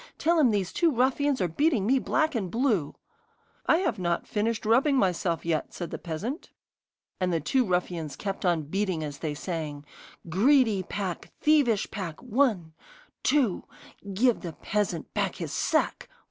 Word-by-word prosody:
Tell 335 +1 +2
him 275 -5 +5
these 200 -4 -1
two 340 - +3
ruffians 265 +2 +1
are 180 - +2
beating 240 - +1
me 265 +4 +3
black 315 +3 +1
and 205 -7 -2
blue.' 225 - 0 0.7
'I've 340 - +2
not 170 -1 -1
finished 220 +1 -1
rubbing 260 +6 +4
myself 180 -6 0
yet,' 165 -2 -1
said 175 -3 -5
the - - -5
peasant. 200 - -5 0.7
And 185 -1 +1
the 165 - +1
two 255 - +2
ruffians 175 - -2
kept 195 +4 -4
on 170 -4 +2
beating 185 +1 -1
as 145 -2 -6
they 150 -2 -3
sang: 150 -3 -5 0.4
'Greedy 220 - +4
pack! 185 -1 -4
Thievish 285 -9 +3
pack! 180 -6 -5
One 220 - +1 0.5
two 265 -11 +1 0.5
Give 235 +5 +2
the 170 -3 -6
peasant 200 -5 -2
back - - -1
his - - -5
sack! - - 0
200 Hz, 155 wpm, -27 LUFS, 170-255 Hz, 0.7 s, him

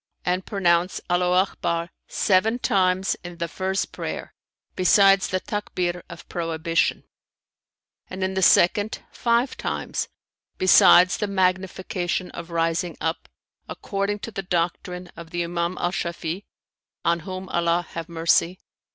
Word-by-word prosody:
'[FN#319] 180 - +2
and 185 +1 -4
pronounce 175 -3 +1
'Allaho 180 +1 +3
Akbar' 170 0 -2 0.2
seven 210 +4 +2
times 190 -4 +1
in 175 -1 -8
the 170 -1 -2
first 190 +3 -2
prayer, - - -6 0.4
besides 195 +1 +5
the 185 - -1
Takbir 180 -4 -3
of 170 0 -11
prohibition; 165 0 -1 1.1
and, 185 0 -4
in 190 0 -1
the 190 - -1
second, 205 +4 +4
five 235 +2 +1
times, - - -3 0.5
besides 180 -1 +6
the 210 - -1
magnification 185 -1 -1
of 170 0 -8
rising 165 +1 -1
up 160 +1 -3 0.4
(according 200 +1 -2
to 230 - -7
the 195 - -4
doctrine 180 0 -2
of 170 -1 -10
the 175 0 -2
Imam 170 +1 -2
Al 175 - 0
Shafi'i, 170 +1 -4 0.6
on 170 0 +2
whom 185 +2 -7
Allah 170 0 +1
have 165 0 -6
mercy!) 170 +2 +2
180 Hz, 135 wpm, -24 LUFS, 170-190 Hz, 1.1 s, besides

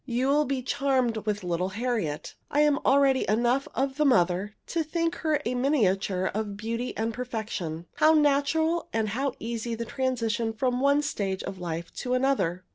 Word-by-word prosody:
You 255 +1 0
will 295 +2 +3
be 265 -1 -2
charmed 260 -3 +1
with 210 -1 -1
little 180 +1 -1
Harriet. 225 -12 -2 0.2
I 295 - +2
am 295 -1 +3
already 275 -2 +3
enough 240 +5 +2
of 270 +1 -1
the 305 - +3
mother 200 -5 +2
to 335 - -1
think 330 +2 -1
her 310 -2 +1
a 240 - 0
miniature 195 -8 +1
of 205 -1 -3
beauty 230 +3 -3
and 225 +1 -1
perfection. 215 -9 -4
How 315 +1 +5
natural 310 +3 +2
and 220 -1 0
how 265 +6 -1
easy 230 0 -3
the 235 +1 -4
transition 230 -2 -1
from 250 +2 0
one 280 +2 +3
stage 195 -10 -2
of 190 -1 -6
life 170 -1 -5
to 250 -1 -1
another! 195 -10 +1
245 Hz, 175 wpm, -27 LUFS, 210-275 Hz, 0.2 s, How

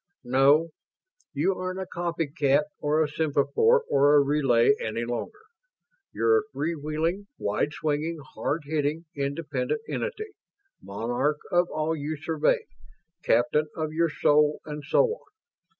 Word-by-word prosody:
"No. 140 +6 +4 0.6
You 195 - +1
aren't 185 +1 -4
a 190 - -3
copycat 160 -5 0 0.2
or 150 +2 +2
a - - -1
semaphore 160 - +2
or 145 +1 +4
a - - +7
relay 140 -4 +3
any 115 +2 -2
longer. 120 - -5 0.7
You're 445 0 +3
a 430 0 -9
free 165 +3 -2
wheeling, 160 +6 -2
wide 105 +8 -1
swinging, 155 +2 -2 0.2
hard 155 +1 -2
hitting, 150 +2 -1
independent 140 - -2
entity 435 -3 -4 0.5
monarch 120 +9 -1
of 175 0 +3
all 155 +1 -1
you 155 +1 -4
survey 160 - 0 0.6
captain 120 +6 +2
of 155 -1 -3
your 165 +1 +2
soul 150 0 +3
and 150 -1 -6
so 145 - +3
on. 460 0 -5
150 Hz, 135 wpm, -26 LUFS, 140-170 Hz, 0.7 s, a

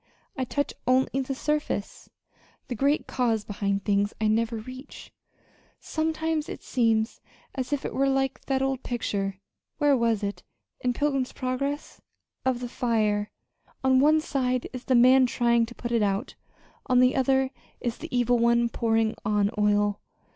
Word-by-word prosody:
I 260 - -1
touch 285 +3 -2
only 260 +1 +2
the 270 +1 -3
surface. 300 -7 -2 0.6
The - - -1
great 280 +6 +1
cause 230 -4 0
behind 200 -1 -2
things 205 0 +1
I 215 -1 +2
never 230 +1 +1
reach. 255 +5 -10 0.7
Sometimes 320 0 -1
it - - -7
seems 225 -2 +1 0.3
as 260 -1 -4
if 285 -2 -1
it - - -3
were 275 0 +2
like 270 0 0
that 270 -1 +1
old 270 -1 -1
picture 195 -5 -2 0.4
where 290 -2 +4
was 230 -4 +1
it? 200 0 -3 0.4
in 250 -1 0
Pilgrim's 275 -1 0
Progress? 275 +3 -3 0.4
of 255 -2 0
the 245 - -3
fire. 215 -4 0 0.5
On 260 0 +4
one 305 +3 +5
side 255 -4 -1
is 255 0 -7
the 260 - +2
man 255 +2 +6
trying 235 -2 +2
to 240 - -11
put 240 - -5
it 230 -2 +2
out; 205 +4 0 0.5
on 250 -2 +4
the 255 0 +4
other, 265 0 +2 0.3
is 240 -1 -3
the - - -7
evil 245 -1 +2
one 235 0 +3
pouring 225 -1 +1
on 205 0 +1
oil. 205 -1 +2
245 Hz, 160 wpm, -26 LUFS, 220-265 Hz, 0.7 s, man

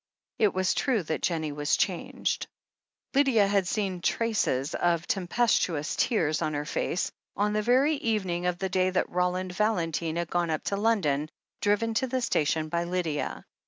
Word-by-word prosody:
It 210 -3 +4
was 185 0 +2
true 240 -8 +1
that 160 0 -3
Jennie 160 -3 -1
was 145 +1 0
changed. - - -1 0.7
Lydia 265 -7 +4
had 195 -2 +1
seen 190 -3 -1
traces 190 - 0
of 170 -1 +1
tempestuous 180 -5 +1
tears 155 - +1
on 155 - -1
her 145 0 -2
face, 170 +2 -1 0.3
on 210 +1 +1
the 215 - +1
very 265 +7 +3
evening 190 -8 -1
of 180 -1 0
the 190 +2 -2
day 185 0 +2
that 185 - -1
Roland 180 +1 0
Val 215 +4 +2
entine 165 -1 -2
had 170 -1 -3
gone 175 -1 +1
up 155 -1 -1
to 200 - -1
London, 180 -9 +1 0.3
driven 210 +2 +1
to 260 +4 +1
the 260 +1 -1
station 155 -7 +1
by 170 +2 -1
Lydia. 170 -4 -2
180 Hz, 170 wpm, -28 LUFS, 165-215 Hz, 0.7 s, It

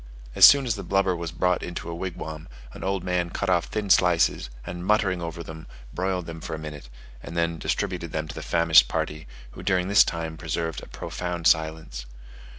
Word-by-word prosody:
As - - +9
soon 140 -1 +7
as 120 - +1
the 100 - -6
blubber 95 -2 +1
was 85 -2 -5
brought 90 +1 +1
into 85 -1 -6
a 85 - -4
wigwam, 85 -3 -6 0.3
an - - -9
old 95 -1 -1
man 90 -1 -1
cut 95 +2 -2
off 85 -2 +2
thin 105 -3 -3
slices, 90 -8 +3 0.2
and 90 0 -6
muttering 95 -3 +1
over 85 0 -5
them, 80 0 -10 0.3
broiled 90 -1 -2
them 80 -1 -8
for 80 - -5
a - - -6
minute, 75 -5 -8 0.3
and 85 -1 -2
distributed - - -2
them 80 0 -3
to - - -7
the - - -7
famished 85 -1 +5
party, 75 +1 -3 0.2
who - - -10
during 95 -1 0
this 100 +2 +7
time 80 -1 -4
preserved 80 0 -3
a - - -11
profound 90 -2 -5
silence. 80 -7 +1
85 Hz, 195 wpm, -25 LUFS, 80-90 Hz, 0.3 s, As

